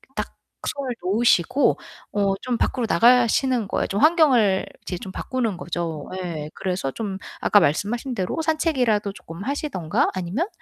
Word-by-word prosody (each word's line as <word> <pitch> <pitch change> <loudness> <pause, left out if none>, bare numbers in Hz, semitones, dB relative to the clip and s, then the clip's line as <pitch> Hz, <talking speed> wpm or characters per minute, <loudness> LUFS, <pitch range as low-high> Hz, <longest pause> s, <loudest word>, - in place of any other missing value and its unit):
딱 - - -4 0.3
손을 270 -3 -2
놓으시고 225 - +3 0.4
어 200 -1 +2
좀 245 -2 -1
밖으로 245 -3 0
나가시는 245 +2 +4
거예요. - - 0
좀 200 - -2
환경을 265 - +4 0.2
이제 180 - -5
좀 190 -3 -8
바꾸는 230 -7 -2
거죠 170 -4 -4
예. 155 -4 -5
그래서 180 -7 -2
좀 200 0 -4 0.2
아까 205 - +5
말씀하신 215 - 0
대로 190 - -2
산책이라도 260 - +1
쪼끔 165 0 -9
하시든가 270 - -1
아니면 185 - -1
210 Hz, 330 characters per minute, -23 LUFS, 185-255 Hz, 0.4 s, 아까